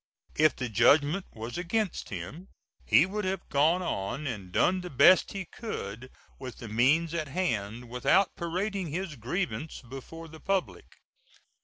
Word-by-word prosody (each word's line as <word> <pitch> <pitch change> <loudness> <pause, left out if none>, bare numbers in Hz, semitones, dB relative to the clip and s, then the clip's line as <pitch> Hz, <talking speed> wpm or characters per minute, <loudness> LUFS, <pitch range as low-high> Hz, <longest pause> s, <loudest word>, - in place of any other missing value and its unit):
If 155 -1 +4
the 125 - -3
judgment 145 - +3
was 115 +8 -6
against 190 +2 -1
him 105 - -7 0.4
he 155 - +6
would 210 +3 -3
have 190 -1 -3
gone 160 +6 +3
on 125 - -3
and 105 -9 -5
done 185 - +2
the 180 - -7
best 140 +7 +5
he 195 -2 -4
could 130 - -6 0.3
with 130 -2 -7
the 115 - -8
means 140 +10 +2
at 160 -3 -2
hand 120 - -2
without 125 +11 +2
parading 185 +3 -2
his 170 +1 -4
grievance 135 - -3
before 150 +6 -9
the 160 0 -12
public. 195 +1 -2
155 Hz, 150 wpm, -29 LUFS, 125-185 Hz, 0.4 s, he